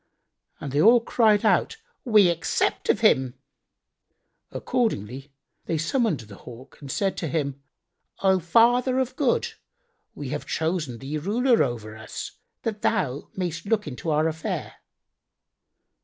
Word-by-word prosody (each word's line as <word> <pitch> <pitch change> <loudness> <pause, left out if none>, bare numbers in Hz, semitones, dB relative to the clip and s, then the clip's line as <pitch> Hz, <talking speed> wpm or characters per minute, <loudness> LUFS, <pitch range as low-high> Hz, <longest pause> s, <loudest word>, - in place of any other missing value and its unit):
And 140 - -6
they 145 +2 +2
all 235 +5 +7
cried 225 -2 +2
out, 215 - +2 0.3
"We 210 -6 +5
accept 170 -1 -1
of - - +2
him." 130 -1 +3 1.1
Accordingly 135 - -2 0.3
they 165 - -1
summoned 180 - 0
the 105 -3 -13
Hawk 125 +2 -13
and 140 -2 -7
said 195 -2 0
to 165 - -3
him, 140 -3 -2 0.6
"O 190 -1 +4
Father 240 +8 +3
of 260 -1 -1
Good,[FN#90] 290 - 0 0.6
we - - -6
have - - -5
chosen 160 -6 -2
thee 140 +5 -4
ruler 235 - +2
over 110 -4 -2
us, 110 0 -7 0.3
that 215 -2 -3
thou 150 - -1
mayst 175 -1 -4
look 215 -1 +1
into 150 +2 -5
our 155 +1 +2
affair." 160 -1 -4
170 Hz, 135 wpm, -25 LUFS, 140-225 Hz, 1.1 s, all